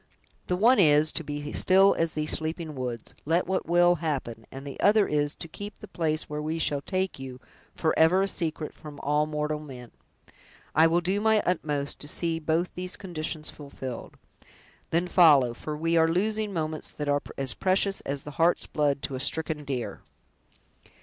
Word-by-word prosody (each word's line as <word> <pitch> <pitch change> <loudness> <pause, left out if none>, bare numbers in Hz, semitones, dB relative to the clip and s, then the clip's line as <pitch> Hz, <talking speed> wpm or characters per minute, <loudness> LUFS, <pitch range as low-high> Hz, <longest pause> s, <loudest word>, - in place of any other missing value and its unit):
"The 180 - +1
one 230 +6 +5
is, 155 -3 +6
to 165 - -3
be 145 0 -5
still 195 +1 +5
as 165 -1 0
these 155 0 -1
sleeping 160 0 -3
woods, 125 -4 -5
let 165 +4 +1
what 190 +1 -2
will 175 +1 +4
happen 130 -8 -3
and 135 +1 -8
the 140 - -8
other 205 0 +4
is, 145 -1 0
to - - -8
keep 205 +6 -8
the - - -11
place 155 -2 -1
where 150 0 -5
we 155 +2 -2
shall 145 -3 0
take 185 0 -2
you, 130 -1 -8 0.4
forever 160 +3 +3
a - - 0
secret 160 -4 -3
from 150 -2 -11
all 150 +1 +1
mortal 150 0 -2
men." 130 -5 -10 0.8
"I 160 +1 +6
will 170 +2 +2
do 190 +4 0
my 220 -1 +3
utmost 150 -5 -1
to 145 - -9
see 165 +2 -1
both 165 +3 0
these 180 +1 -4
conditions 160 -4 -4
fulfilled." 135 -4 -8 0.7
"Then 170 +2 +1
follow, 145 -9 +5
for 150 +5 -6
we 165 +2 0
are 160 0 +5
losing 210 +5 0
moments 155 -3 -3
that 150 - -5
are 145 0 +2 0.2
as 135 -3 0
precious 195 +1 +1
as 140 0 -4
the 150 - -8
heart's 170 +2 +3
blood 145 -2 0
to - - -3
a 130 - -3
stricken 155 +2 0
deer!" 130 -4 -4
155 Hz, 185 wpm, -27 LUFS, 145-175 Hz, 0.8 s, is